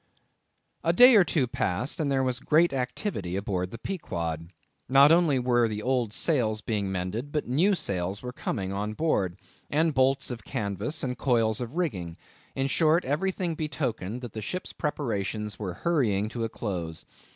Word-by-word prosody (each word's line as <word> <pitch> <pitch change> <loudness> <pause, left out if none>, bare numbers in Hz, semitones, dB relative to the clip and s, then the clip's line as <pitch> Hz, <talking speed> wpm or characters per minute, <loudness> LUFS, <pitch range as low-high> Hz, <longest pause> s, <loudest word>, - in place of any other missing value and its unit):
A 165 - +3
day 250 +5 +8
or 200 - +8
two 155 -6 +1
passed, 115 - -2
and 145 -3 0
there 135 -1 +2
was 130 -1 0
great 160 +4 +3
activity 125 - -3
aboard 95 -2 -2
the 115 - -8
Pequod. 85 - -4 0.4
Not 140 +3 +7
only 165 -5 +4
were 120 -2 +3
the 105 -1 -4
old 125 -4 +1
sails 110 -6 0
being 105 -3 -2
mended, 95 +9 -3
but 150 -1 -2
new 170 +11 +3
sails 95 - -3
were 125 0 -5
coming 95 -6 -3
on 105 +2 -2
board, 100 - 0 0.3
and 160 +2 +2
bolts 135 0 +2
of 115 -3 -6
canvas, 105 - -3
and 125 -2 -3
coils 115 -4 +2
of 120 +4 -5
rigging; 95 - -2 0.4
in 135 - 0
short, 160 +4 +3
everything 175 +4 -1
betokened 130 - -3
that 120 -4 -7
the 110 - -5
ship's 180 - -5
preparations 105 - -3
were 95 -5 -4
hurrying 110 - +1
to 115 0 -4
a - - -3
close. 85 -8 -5
125 Hz, 170 wpm, -27 LUFS, 100-150 Hz, 0.4 s, day